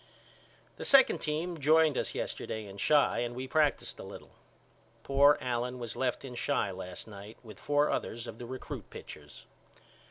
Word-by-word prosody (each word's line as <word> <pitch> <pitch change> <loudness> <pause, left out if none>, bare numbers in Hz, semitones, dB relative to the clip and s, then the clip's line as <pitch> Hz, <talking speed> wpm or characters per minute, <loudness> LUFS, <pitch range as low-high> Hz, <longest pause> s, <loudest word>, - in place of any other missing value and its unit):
The - - -6
second 275 -1 +6
team 160 +2 -2
joined 155 +1 +4
us - - -2
yesterday 110 -1 -4
in 100 0 -10
Chi 150 0 +3
and 120 0 -2
we 130 +1 -5
practiced 150 +2 +1
a - - -7
little. - - -11 0.7
Poor 140 +1 +5
Allen 125 0 -2
was 120 -2 -5
left 130 +1 -1
in 125 -2 -8
Chi 120 -4 0
last 90 +1 -7
night 105 +1 -10
with 110 -4 -12
four 145 0 +2
others 115 +1 -3
of 115 - -8
the 120 - -7
recrut 130 +1 -7
pitchers. 75 -1 -11
125 Hz, 165 wpm, -31 LUFS, 110-145 Hz, 0.7 s, second